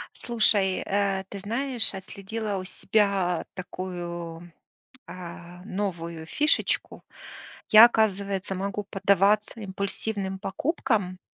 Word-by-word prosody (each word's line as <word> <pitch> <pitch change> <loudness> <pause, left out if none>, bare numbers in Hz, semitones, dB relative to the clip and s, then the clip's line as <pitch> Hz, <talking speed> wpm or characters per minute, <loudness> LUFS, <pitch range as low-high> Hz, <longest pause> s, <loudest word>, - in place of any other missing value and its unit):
Слушай, 215 -5 +2
э, 195 -1 0
ты 200 - -7
знаешь, 230 +3 0
отследила 200 +2 -4
у 185 - -5
себя 190 -2 +1
такую, 175 -2 -6 0.6
а, 175 0 -9
новую 170 -5 -4
фишечку. 300 - 0 0.7
Я, 215 +2 +11
оказывается, 200 -4 0
могу 200 +2 -3
поддаваться 200 +3 +2
импульсивным 200 0 -3
покупкам. 200 - -1
195 Hz, 90 wpm, -26 LUFS, 185-210 Hz, 0.7 s, Я